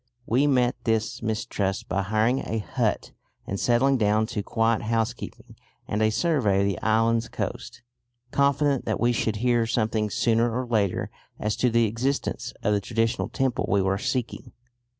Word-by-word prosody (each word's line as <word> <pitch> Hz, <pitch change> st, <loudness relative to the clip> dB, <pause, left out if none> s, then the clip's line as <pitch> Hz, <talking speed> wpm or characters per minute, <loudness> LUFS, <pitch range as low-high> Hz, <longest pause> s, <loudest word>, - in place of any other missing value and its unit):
We 130 Hz, +6 st, +2 dB
met 125 Hz, -2 st, +1 dB
this 110 Hz, -1 st, 0 dB
mistrust 105 Hz, -3 st, -2 dB
by 100 Hz, -, 0 dB
hiring 110 Hz, +6 st, +1 dB
a 115 Hz, -, -3 dB
hut 105 Hz, -, -1 dB, 0.3 s
and 100 Hz, -, -4 dB
settling 130 Hz, +2 st, +3 dB
down 105 Hz, 0 st, +2 dB
to 105 Hz, -, -1 dB
quiet 115 Hz, +2 st, +1 dB
housekeeping 115 Hz, +2 st, -3 dB, 0.3 s
and 105 Hz, -, -1 dB
a 110 Hz, -, +4 dB
survey 110 Hz, -, +1 dB
of -, -, +2 dB
the 100 Hz, -3 st, -2 dB
island's 115 Hz, +1 st, +2 dB
coast, -, -, -5 dB, 0.5 s
confident 140 Hz, -1 st, +2 dB
that -, -, -1 dB
we 120 Hz, +1 st, +3 dB
should 110 Hz, -2 st, 0 dB
hear 120 Hz, +1 st, +1 dB
something 110 Hz, -2 st, 0 dB
sooner 115 Hz, +3 st, +1 dB
or 130 Hz, -, -2 dB
later 110 Hz, -5 st, 0 dB, 0.3 s
as 105 Hz, 0 st, -1 dB
to 125 Hz, -, +2 dB
the 115 Hz, 0 st, +3 dB
existence 120 Hz, +6 st, -2 dB
of 105 Hz, -, +2 dB
the 100 Hz, -, +1 dB
traditional 115 Hz, +2 st, -1 dB
temple 130 Hz, -3 st, -1 dB
we 100 Hz, -2 st, +3 dB
were 95 Hz, +1 st, 0 dB
seeking. 125 Hz, 0 st, -3 dB
115 Hz, 165 wpm, -25 LUFS, 105-120 Hz, 0.5 s, a